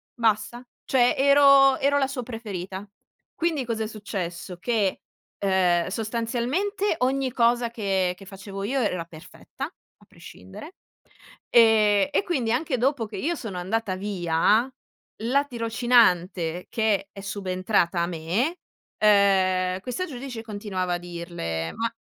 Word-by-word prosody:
basta. 230 Hz, +1 st, 0 dB, 0.2 s
Cioè, 245 Hz, -2 st, +3 dB
ero 275 Hz, -1 st, +6 dB
ero 285 Hz, +1 st, +2 dB
la 270 Hz, -, +1 dB
sua 265 Hz, -2 st, -5 dB
preferita, 200 Hz, -5 st, -6 dB, 0.5 s
quindi 325 Hz, -5 st, 0 dB
cosa 225 Hz, -2 st, -2 dB
è -, -, -3 dB
successo? 185 Hz, -4 st, -6 dB
Che, 210 Hz, -2 st, 0 dB, 0.4 s
uhm, 180 Hz, -3 st, +2 dB
sostanzialmente 240 Hz, -, -1 dB
ogni 265 Hz, 0 st, +1 dB
cosa 235 Hz, 0 st, +2 dB
che 195 Hz, -5 st, 0 dB
che 195 Hz, -, -13 dB
facevo 195 Hz, +1 st, -8 dB
io 265 Hz, +6 st, -1 dB
e -, -, +1 dB
era 180 Hz, -4 st, -2 dB
perfetta 160 Hz, 0 st, -9 dB
a -, -, -17 dB
prescindere, 95 Hz, -, -12 dB, 0.7 s
ehm, 220 Hz, 0 st, +5 dB
e 385 Hz, -, +1 dB
quindi, 260 Hz, -11 st, -1 dB
anche 265 Hz, +1 st, 0 dB
dopo 260 Hz, -2 st, +1 dB
che 205 Hz, -2 st, -8 dB
io 335 Hz, -, -1 dB
sono 210 Hz, -9 st, -6 dB
andata 195 Hz, +1 st, -2 dB
via, 195 Hz, +4 st, +1 dB, 0.6 s
la 280 Hz, +5 st, +2 dB
tirocinante 225 Hz, -, +1 dB
che 210 Hz, -3 st, 0 dB
è 195 Hz, -, -10 dB
subentrata 185 Hz, -2 st, 0 dB
a 170 Hz, -, 0 dB
me, 180 Hz, -, -1 dB, 0.4 s
uhm, 190 Hz, -3 st, +3 dB
questa 255 Hz, -, -3 dB
giudice 250 Hz, -5 st, -7 dB
continuava 205 Hz, -4 st, -3 dB
a -, -, -1 dB
dirle: 170 Hz, -, -5 dB
"Ma" 230 Hz, -, -1 dB
215 Hz, 135 wpm, -25 LUFS, 185-250 Hz, 0.7 s, ero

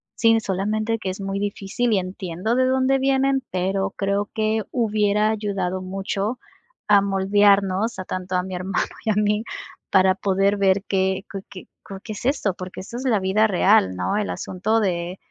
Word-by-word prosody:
Sí, 225 Hz, -1 st, +4 dB
solamente 215 Hz, +3 st, -1 dB
que 190 Hz, -, -3 dB
es 190 Hz, -, -8 dB
muy 195 Hz, 0 st, -3 dB
difícil 205 Hz, +3 st, -1 dB
y 195 Hz, -, +3 dB
entiendo 185 Hz, +4 st, -3 dB
de 255 Hz, -, +3 dB
dónde 265 Hz, +1 st, +2 dB
vienen, 270 Hz, 0 st, +2 dB
pero 195 Hz, +2 st, -1 dB
creo 200 Hz, +1 st, -1 dB
que 220 Hz, 0 st, 0 dB
hubiera 210 Hz, -2 st, +1 dB
ayudado 195 Hz, -4 st, -2 dB
mucho 195 Hz, +4 st, -3 dB, 0.5 s
a 205 Hz, -1 st, +7 dB
moldearnos 200 Hz, +2 st, +2 dB
a -, -, -3 dB
tanto 185 Hz, 0 st, -4 dB
a 180 Hz, -, +1 dB
mi 185 Hz, -1 st, -6 dB
hermano 185 Hz, +2 st, -1 dB, 0.2 s
y 220 Hz, -, +2 dB
a -, -, 0 dB
mí 210 Hz, +1 st, +1 dB, 0.5 s
para 190 Hz, 0 st, +4 dB
poder 195 Hz, +1 st, +1 dB
ver 195 Hz, 0 st, +2 dB
qué 190 Hz, 0 st, 0 dB
qué 195 Hz, -, -4 dB
qué 185 Hz, -, -10 dB, 0.4 s
qué 220 Hz, -, -7 dB
es 210 Hz, -, -8 dB
esto, 250 Hz, -8 st, +1 dB
porque 185 Hz, 0 st, -7 dB
eso 230 Hz, +5 st, -8 dB
es 260 Hz, -, -5 dB
la 225 Hz, -5 st, +3 dB
vida 200 Hz, +4 st, +3 dB
real, 95 Hz, -, +3 dB
¿no? 90 Hz, -, -1 dB
El 210 Hz, -, -1 dB
asunto 215 Hz, +5 st, -1 dB
de 180 Hz, -1 st, -2 dB
200 Hz, 180 wpm, -22 LUFS, 190-215 Hz, 0.5 s, a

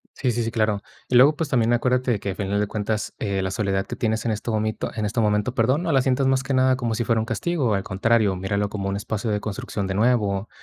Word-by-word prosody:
Sí, 125 Hz, -, 0 dB
sí, 120 Hz, 0 st, -1 dB
sí, 115 Hz, -, -2 dB
claro, 110 Hz, -4 st, 0 dB, 0.3 s
y 125 Hz, -, 0 dB
luego, 140 Hz, +5 st, +7 dB
pues, 155 Hz, -1 st, -3 dB
también 120 Hz, -3 st, +2 dB
acuérdate 125 Hz, -1 st, +1 dB
que, 100 Hz, 0 st, -3 dB
a -, -, -6 dB
final 100 Hz, 0 st, -1 dB
de 105 Hz, -, 0 dB
cuentas, 105 Hz, +1 st, -3 dB
eh, 100 Hz, -3 st, -1 dB
la 95 Hz, -, -1 dB
soledad 95 Hz, -1 st, -1 dB
que -, -, -5 dB
tienes 110 Hz, -2 st, -1 dB
en 115 Hz, -, +1 dB
este 110 Hz, +2 st, -3 dB
momento, 110 Hz, 0 st, -2 dB
en 110 Hz, -, -2 dB
este 105 Hz, +3 st, 0 dB
momento, 105 Hz, +3 st, +1 dB
perdón, 130 Hz, +6 st, +2 dB
no 170 Hz, -, 0 dB
la 135 Hz, -, +4 dB
sientas 130 Hz, +1 st, +1 dB
más 135 Hz, 0 st, +2 dB
que 135 Hz, 0 st, -2 dB
nada 130 Hz, 0 st, +4 dB
como 120 Hz, -3 st, -2 dB
si 120 Hz, +1 st, -1 dB
fuera 115 Hz, 0 st, +2 dB
un -, -, -3 dB
castigo, 125 Hz, -, -1 dB
al 95 Hz, -1 st, 0 dB
contrario, 105 Hz, 0 st, +1 dB
míralo 100 Hz, +2 st, -1 dB
como 100 Hz, -1 st, -3 dB
un 100 Hz, -, -2 dB
espacio 110 Hz, +2 st, -3 dB
de 105 Hz, -, 0 dB
construcción 100 Hz, -1 st, -4 dB
de 95 Hz, -, -2 dB
nuevo, 105 Hz, -3 st, +1 dB
110 Hz, 265 wpm, -23 LUFS, 100-125 Hz, 0.3 s, luego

